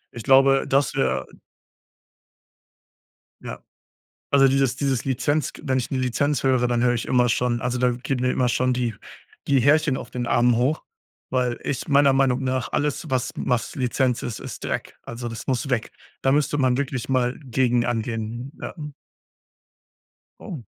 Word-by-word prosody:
Ich 115 Hz, -, -6 dB
glaube, 135 Hz, +2 st, +5 dB
dass 135 Hz, -1 st, +2 dB
wäre -, -, 0 dB, 2.2 s
Ja. -, -, -7 dB, 0.7 s
Also 135 Hz, -1 st, +5 dB
dieses 135 Hz, -2 st, +1 dB
dieses 135 Hz, -4 st, -1 dB
Lizenz 140 Hz, +4 st, 0 dB
g -, -, -13 dB
wenn 130 Hz, -1 st, +1 dB
ich 125 Hz, -, -3 dB
nur 130 Hz, -, -1 dB
Lizenz 130 Hz, +3 st, 0 dB
höre, 130 Hz, -2 st, +2 dB
dann 120 Hz, -1 st, 0 dB
höre 125 Hz, 0 st, +3 dB
ich 120 Hz, -, -3 dB
immer 125 Hz, -1 st, +3 dB
schon 120 Hz, 0 st, 0 dB
also, 125 Hz, +1 st, -2 dB
da 125 Hz, 0 st, +3 dB
geht 125 Hz, +2 st, -3 dB
mir 125 Hz, 0 st, +1 dB
immer 125 Hz, -1 st, +1 dB
schon 125 Hz, +2 st, +1 dB
die 120 Hz, -2 st, -1 dB, 0.5 s
die 140 Hz, -2 st, +3 dB
Härchen 145 Hz, +1 st, +3 dB
auf -, -, -8 dB
den 125 Hz, -1 st, -4 dB
Armen 120 Hz, 0 st, +3 dB
hoch, 130 Hz, +6 st, +1 dB, 0.5 s
weil 125 Hz, -2 st, 0 dB
ich 135 Hz, -, -3 dB
meiner 140 Hz, -1 st, +5 dB
Meinung 135 Hz, -1 st, +2 dB
nach 130 Hz, -2 st, -2 dB
alles 145 Hz, -1 st, -1 dB
was 130 Hz, -1 st, -1 dB
was 125 Hz, -2 st, -1 dB
Lizenz 125 Hz, -1 st, 0 dB
ist, 115 Hz, -, -5 dB
ist -, -, -8 dB
Dreck. -, -, -4 dB
Also, 120 Hz, +1 st, -6 dB
das 115 Hz, -1 st, -7 dB
muss 135 Hz, +2 st, -1 dB
weg. 125 Hz, -3 st, -1 dB, 0.3 s
Da 135 Hz, -, +3 dB
müsste 145 Hz, 0 st, +1 dB
man 130 Hz, -2 st, +2 dB
wirklich 135 Hz, -3 st, -3 dB
mal 125 Hz, -1 st, 0 dB
gegen 125 Hz, -1 st, +1 dB
angehen. 115 Hz, +2 st, -3 dB
Ja. -, -, -6 dB, 1.7 s
Oh. 165 Hz, -, -7 dB
125 Hz, 170 wpm, -23 LUFS, 120-135 Hz, 2.2 s, glaube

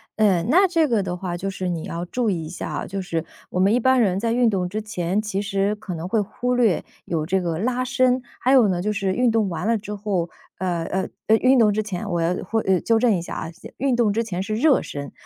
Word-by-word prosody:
嗯， 200 Hz, -4 st, +2 dB
那 375 Hz, +6 st, +5 dB
这 330 Hz, -4 st, +2 dB
个 225 Hz, -5 st, +1 dB
的 180 Hz, -, -3 dB
话， 180 Hz, -1 st, -4 dB
就 195 Hz, +3 st, -3 dB
是 185 Hz, -1 st, -3 dB
你 165 Hz, -2 st, -3 dB
要 170 Hz, +1 st, -4 dB
注 235 Hz, +5 st, -1 dB
意 165 Hz, -4 st, -3 dB
一 -, -, -7 dB
下 175 Hz, -, -6 dB
啊， -, -, -4 dB
就 195 Hz, -, -4 dB
是 170 Hz, -4 st, -2 dB, 0.3 s
我 180 Hz, -, -1 dB
们 195 Hz, +3 st, +4 dB
一 245 Hz, -, +3 dB
般 260 Hz, 0 st, +4 dB
人 190 Hz, -3 st, +2 dB
在 230 Hz, +2 st, 0 dB
运 240 Hz, 0 st, +3 dB
动 185 Hz, -4 st, 0 dB
之 215 Hz, +4 st, -4 dB
前， 210 Hz, -2 st, -1 dB
其 210 Hz, -2 st, -3 dB
实 200 Hz, +1 st, 0 dB
可 205 Hz, -3 st, -7 dB
能 165 Hz, +1 st, -5 dB
会 220 Hz, +4 st, +1 dB
忽 245 Hz, +5 st, -1 dB
略 225 Hz, -8 st, +2 dB, 0.2 s
有 160 Hz, -3 st, -2 dB
这 190 Hz, +3 st, +1 dB
个 170 Hz, -2 st, -2 dB
拉 255 Hz, +3 st, 0 dB
伸， 255 Hz, -1 st, +2 dB, 0.2 s
还 255 Hz, -, +2 dB
有 255 Hz, -5 st, +6 dB
呢， 180 Hz, -2 st, 0 dB
就 210 Hz, +3 st, 0 dB
是 200 Hz, -2 st, -1 dB
运 245 Hz, +3 st, +2 dB
动 220 Hz, -3 st, +1 dB
完 180 Hz, +3 st, -3 dB
了 230 Hz, 0 st, +3 dB
之 210 Hz, 0 st, -7 dB
后 195 Hz, -5 st, -2 dB, 0.3 s
呃， 175 Hz, -2 st, -1 dB
呃， 190 Hz, +2 st, -2 dB, 0.2 s
呃， 220 Hz, -, +6 dB
运 255 Hz, +2 st, +4 dB
动 215 Hz, -2 st, +5 dB
之 215 Hz, +1 st, 0 dB
前 205 Hz, 0 st, -5 dB
我 175 Hz, -2 st, 0 dB
要 165 Hz, +2 st, +1 dB
会 225 Hz, +4 st, -1 dB
呃， 190 Hz, -1 st, +2 dB
纠 230 Hz, -, +2 dB
正 230 Hz, -1 st, +3 dB
一 175 Hz, -, -2 dB
下 170 Hz, -, -7 dB
啊， 165 Hz, -, -5 dB
先 165 Hz, -, -13 dB
运 270 Hz, -2 st, +1 dB
动 230 Hz, -4 st, +2 dB
之 230 Hz, +2 st, 0 dB
前 185 Hz, -5 st, -4 dB
是 215 Hz, +3 st, -2 dB
热 275 Hz, +5 st, +4 dB
身， 140 Hz, -1 st, -6 dB
205 Hz, 290 characters per minute, -23 LUFS, 180-230 Hz, 0.3 s, 有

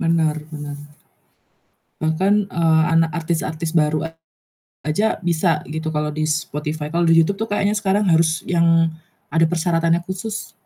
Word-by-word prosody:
Benar 165 Hz, -2 st, +1 dB
benar. 145 Hz, -2 st, -7 dB, 1.3 s
Bahkan, 190 Hz, +6 st, +1 dB
eee, 160 Hz, -2 st, +3 dB
anak 165 Hz, 0 st, +3 dB
artis-artis 160 Hz, -1 st, -2 dB
baru 155 Hz, 0 st, +1 dB, 0.7 s
aja 205 Hz, +9 st, +1 dB
bisa 170 Hz, -1 st, +1 dB
gitu 160 Hz, +1 st, -4 dB
kalau 150 Hz, -1 st, -1 dB
di 155 Hz, 0 st, -1 dB
Spotify, 150 Hz, 0 st, -3 dB
kalau 170 Hz, 0 st, +2 dB
di 165 Hz, -, +5 dB
YouTube 195 Hz, +5 st, +2 dB
tuh 220 Hz, -, -2 dB
kayaknya 205 Hz, 0 st, +1 dB
sekarang 205 Hz, -1 st, +1 dB
harus 160 Hz, 0 st, +2 dB
yang 165 Hz, -1 st, +3 dB, 0.4 s
ada 165 Hz, +1 st, +4 dB
persyaratannya 170 Hz, 0 st, +1 dB
khusus 195 Hz, +4 st, -5 dB
165 Hz, 135 wpm, -20 LUFS, 155-175 Hz, 1.3 s, di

